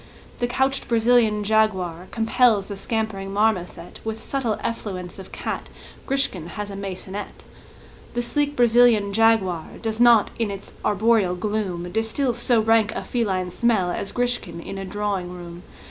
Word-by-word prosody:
The 240 - +1
couched 265 +2 0
Brazilian 225 -2 +3
jaguar 190 -5 +1
Compels 225 -2 +3
the 200 - -6
scampering 200 -2 -3
marmoset 190 -5 -1
With 220 0 -5
subtle 250 -6 -1
effluence 190 -6 -4
of 190 - -10
cat; - - -4 0.4
Grishkin 270 - 0
has 205 +3 -6
a - - -6
maisonette; 195 +1 -6 0.7
The 240 - 0
sleek 290 +4 0
Brazilian 235 -4 +4
jaguar 205 -6 +3
Does 225 -1 -3
not 235 -3 +6
in 225 -3 0
its 200 -1 -7
arboreal 210 -3 +2
gloom 180 -3 -3
Distil 225 +5 0
so 240 -1 +2
rank 220 -1 +3
a - - -3
feline 190 -7 -1
smell 210 -5 +1
As 195 +2 -3
Grishkin 245 -9 -2
in 195 +3 -7
a 195 - -5
drawing 200 -2 -2
room. 175 -1 -9
215 Hz, 145 wpm, -23 LUFS, 190-230 Hz, 0.7 s, not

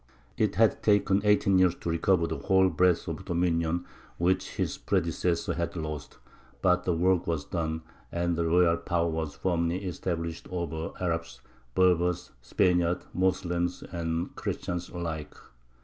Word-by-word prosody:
] - - -33
It 100 - -3
had 110 0 +3
taken 100 -1 +3
eighteen 105 -2 +4
years 90 -2 +4
to - - -5
recover 85 +1 +2
the - - -3
whole 95 -1 +4
breadth 90 -2 +2
of - - -4
dominion 85 0 0 0.3
which 95 +2 0
his - - -1
predecessors 85 -2 0
had 85 +1 -2
lost; 75 -3 -5 0.5
but 90 0 +3
the 90 - +2
work 90 +1 +2
was 80 -4 -1
done, 80 -1 -3 0.3
and 85 0 0
the 85 0 0
royal 85 0 +4
power 85 -1 0
was 80 -3 -3
firmly 85 +2 -1
established 85 -2 -3
over 80 -3 -3
Arabs, 80 -8 -2 0.3
Berbers, 90 -1 +2
Spaniards, 90 +6 +1
Moslems 90 -1 0
and 85 0 -3
Christians 90 0 -3
alike. 80 -3 -5
85 Hz, 145 wpm, -28 LUFS, 85-90 Hz, 0.5 s, eighteen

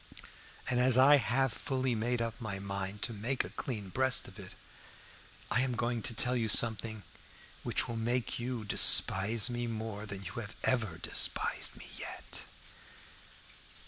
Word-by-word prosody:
And 125 -1 0
as 125 0 +5
I 140 +3 +7
have 135 -1 0
fully 130 -2 -2
made 115 +2 -1
up 115 +1 -6
my 105 -4 -4
mind 100 +1 -5
to 115 - -2
make 120 +6 -2
a - - -9
clean 105 -7 -6
breast 130 +5 +1
of - - -13
it, - - -11 1.0
I 125 - +2
am 130 -2 -1
going 120 0 -2
to 115 - -2
tell 125 +3 +3
you 115 -3 -1
something 110 -1 +3 0.6
which - - +1
will 115 - -5
make 120 +2 -2
you 120 -2 -5
despise 105 +2 +5
me 120 -1 -3
more 110 -2 -6
than 100 -1 -7
you 100 +6 -6 0.2
ever 110 -10 0
despised 85 - 0
me - - -8
yet. - - -6
115 Hz, 155 wpm, -31 LUFS, 105-125 Hz, 1.0 s, I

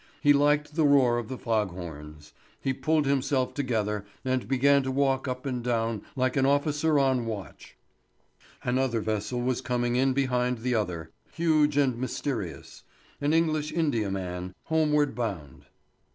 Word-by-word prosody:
He 145 -2 +5
liked 145 +1 +2
the 160 0 +1
roar 135 -5 +4
of 115 - -6
the 130 - -5
fog 110 -4 0
horns. 75 -4 -9 0.3
He 135 - -1
pulled 155 +2 +1
himself 135 -1 +1
together 110 -7 -1 0.2
and 130 -1 -1
began 140 +2 +4
to 130 - -3
walk 135 0 +1
up 130 +1 -4
and 125 -3 -3
down 115 -3 -1
like 130 -1 0
an 135 -1 +3
officer 150 +2 +2
on 130 -4 +2
watch. 105 -4 -7 0.9
Another 125 -1 +1
vessel 110 +3 -2
was 125 -1 0
coming 120 -1 -1
in 130 +1 +3
behind 125 -2 0
the 125 0 0
other, 90 -7 -2 0.2
huge 155 -3 +2
and 130 -5 +2
mysterious. 125 - -4 0.4
An 145 +1 +1
English 155 -2 +1
India 135 -11 0
man, 90 -1 -4
homeward 150 -3 +2
bound. 95 - -5
130 Hz, 150 wpm, -27 LUFS, 115-145 Hz, 0.9 s, He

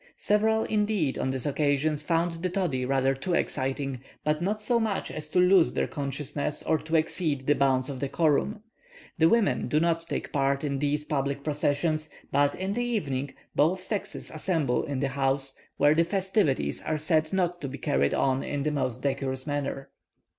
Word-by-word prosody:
Several, 220 +1 +2
indeed, 210 -9 0
on - - 0
this 130 -2 -3
occasion, 145 +1 +1
found 165 +2 -1
the 185 - 0
toddy 170 -9 -1
rather 135 0 +2
too 170 +7 -2
exciting, 135 -2 -2 0.2
but 150 +1 0
not 205 +4 0
so 235 +3 +1
much 220 -3 -1
as 155 0 -5
to 180 - -2
lose 180 -1 +5
their - - +1
consciousness 145 +1 -3
or 160 - +1
to 160 +2 -3
exceed 155 -3 0
the 145 - +4
bounds 130 -2 +2
of 135 -3 -5
decorum. 155 +9 +1 0.6
The 160 0 +6
women 230 -1 +2
do 150 - +2
not 165 0 +1
take - - -4
part 140 -1 +1
in 140 -2 -1
these 145 +1 0
public 140 -1 -1
processions; 155 +1 0 0.2
but, 145 0 +3
in 190 +1 -2
the 240 +3 -1
evening, 140 - -2 0.2
both 180 +5 +2
sexes 205 +1 -4
assemble 155 -6 0
in 140 -2 -3
the 140 - +1
houses, 135 0 0 0.2
where 145 +1 +5
the 165 +2 +4
festivities 185 - 0
are 155 - -1
said 155 0 +1
not 180 -2 0
to 140 - -3
be 135 +1 -6
carried 70 - +1
on 135 0 +1
in 145 -1 -3
the 150 - 0
most 130 -5 -2
decorous 135 -1 -2
manner. 140 -2 -3
150 Hz, 180 wpm, -27 LUFS, 135-175 Hz, 0.6 s, The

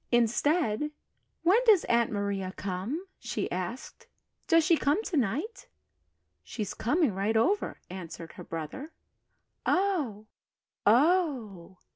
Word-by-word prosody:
Instead, 240 +3 +2 0.5
"When 370 +7 +5
does 425 -7 +6
Aunt 235 -1 +2
Maria 200 -2 -2
come?" 200 - -3
she - - -3
asked. - - -5 0.4
"Does 330 0 +5
she 330 +2 +4
come 300 +7 +1
to 385 - -3
night?" 290 - -1 0.7
"She's 210 -4 -5
coming 290 - +1
right 200 +4 0
over," 390 - +1
answered 170 -3 -8
her - - -10
brother. 165 - -6 0.7
"Oh, 310 - 0 0.6
oh!" 240 - +2
240 Hz, 110 wpm, -29 LUFS, 200-330 Hz, 0.7 s, does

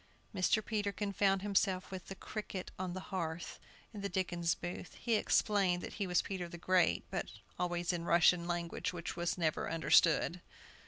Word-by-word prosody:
Mr. 205 +3 +2
Peterkin 205 -2 -2
found 195 0 +2
himself 195 -2 +1
with 185 -2 -7
the 195 - -6
"Cricket 200 -2 -6
on 185 -1 -2
the 185 - -4
Hearth," 165 -2 -3 0.3
in 205 - -6
the 200 - -2
Dickens 175 -2 0
Booth. 175 +1 -6
He 235 - -1
explained 195 -4 +2
that - - -6
he 195 - +1
was 180 -1 +2
Peter 180 -3 -4
the 175 - -8
Great, 180 0 +3
but - - -2 0.3
always 175 0 0
in 175 - -2
the 170 - -7
Russian 170 0 +5
language, 175 +3 -2
which 170 -2 -5
was 175 0 -1
never 160 -3 0
understood. 165 +1 +4
180 Hz, 175 wpm, -34 LUFS, 175-195 Hz, 0.3 s, Russian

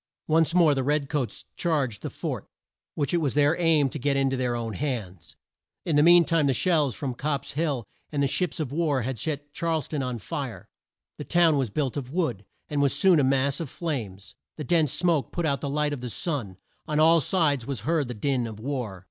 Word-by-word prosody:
Once 160 +1 +2
more 165 -4 +5
the 135 - 0
red 145 0 0
coats 135 -8 -3
charged 140 - -1
the - - -4
fort, - - -5 0.5
which 145 +2 -1
it - - +4
was 140 -4 -1
their 145 +2 +4
aim 160 -4 +4
to 145 - -6
get 140 +1 +1
in 135 -1 +2
to - - 0
their 125 -2 -1
own 115 -2 -3
hands. 110 - -5 0.5
In 160 - 0
the 145 - +5
mean 170 +1 +7
time 160 -3 +2
the 135 - +2
shells 150 - +2
from 135 -3 -3
Copp's 140 +3 -3
Hill 145 -5 -1 0.3
and 145 -2 0
the - - +3
ships 170 +4 -1
of 145 -5 -3
war 145 -5 0
had 130 -1 -3
set 145 +1 -4
Charles 165 -4 -1
town 150 -3 -3
on 125 -2 -3
fire. 105 - -6 0.5
The - - -4
town 170 -3 +3
was 135 -5 0
built 135 +4 -2
of 130 -2 -5
wood, 130 - -1 0.2
and 145 -1 -1
was 140 -2 +2
soon 185 -5 +5
a - - +3
mass 135 +1 +2
of 165 -5 -4
flames. 115 - -5 0.2
The 155 - -4
dense 155 -1 +2
smoke 170 -6 0
put 175 - -2
out 140 -4 0
the 140 - -3
light 150 +1 0
of 135 - -5
the 125 - -4
sun 115 - -3 0.3
On 150 0 0
all 165 +1 +6
sides 145 -6 +1
was 135 -7 -3
heard 155 +1 0
the 125 - -5
din 125 +1 0
of 110 -2 -8
war. 120 -6 -4
145 Hz, 225 wpm, -26 LUFS, 125-160 Hz, 0.5 s, mean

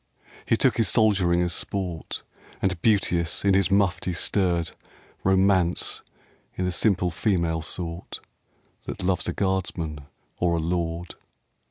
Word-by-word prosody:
He - - +3
took - - +3
his 110 -4 +3
soldiering 95 -6 +3
as 90 -1 0
sport, 90 -5 -4 0.4
And 95 -3 -1
beauteous 90 -6 +1
in 100 - +5
his 95 -1 +3
mufti 95 -2 +1
stirred 85 -2 0 0.5
Romance 95 -2 +2 0.6
i' 95 - -1
the 90 - 0
simple 90 -2 +2
female 85 -3 0
sort 85 +1 -5 0.7
That - - -5
loves 90 0 0
a - - -1
guardsman 90 -5 -2 0.4
or 85 -1 +2
a - - 0
lord. 85 +1 -2
90 Hz, 130 wpm, -25 LUFS, 85-95 Hz, 0.7 s, in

